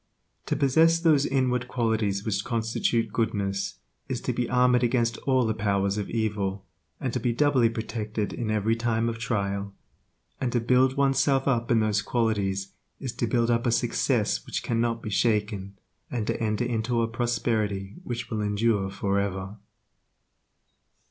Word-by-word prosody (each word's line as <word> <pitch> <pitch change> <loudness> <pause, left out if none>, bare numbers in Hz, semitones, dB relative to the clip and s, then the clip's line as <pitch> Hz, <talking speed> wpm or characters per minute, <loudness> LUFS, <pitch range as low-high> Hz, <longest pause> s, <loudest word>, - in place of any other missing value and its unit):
To - - 0
possess 160 +5 +4
those 155 -4 +4
inward 125 -2 0
qualities 110 -5 0
which 110 -3 0
constitute 115 0 0
goodness 100 -4 -1 0.3
is 130 -2 -2
to 125 - -1
be 120 0 -1
armored 125 0 +4
against 120 -1 +1
all 130 -2 +3
the 110 - +1
powers 100 -2 0
of 100 - -4
evil, 100 -4 -2 0.3
and 130 -3 -3
to 125 - 0
be 120 +1 0
doubly 130 -2 +3
protected 110 -2 -3
in 115 -3 -3
every 110 +1 +1
time 115 0 0
of 115 0 -5
trial; 100 -4 -2 0.6
and 125 - -1
to 120 - +3
build' 130 +3 +3
oneself 135 0 +2
up 120 -3 +1
in 115 -2 +4
those 105 -1 +1
qualities 100 -5 0 0.3
is 130 - -4
to 120 - -1
build 120 0 +2
up 120 +1 +1
a - - +3
success - - +1
which - - -4
cannot 115 0 0
be 110 - -4
shaken, 105 -3 0 0.3
and 120 -4 -2
to 115 - -2
enter 110 +1 0
into 115 0 0
a - - +1
prosperity 110 -4 -1
which 120 -5 -5
will 110 -1 -1
endure 105 -1 +1
forever. 100 0 -2
115 Hz, 160 wpm, -26 LUFS, 105-125 Hz, 0.6 s, possess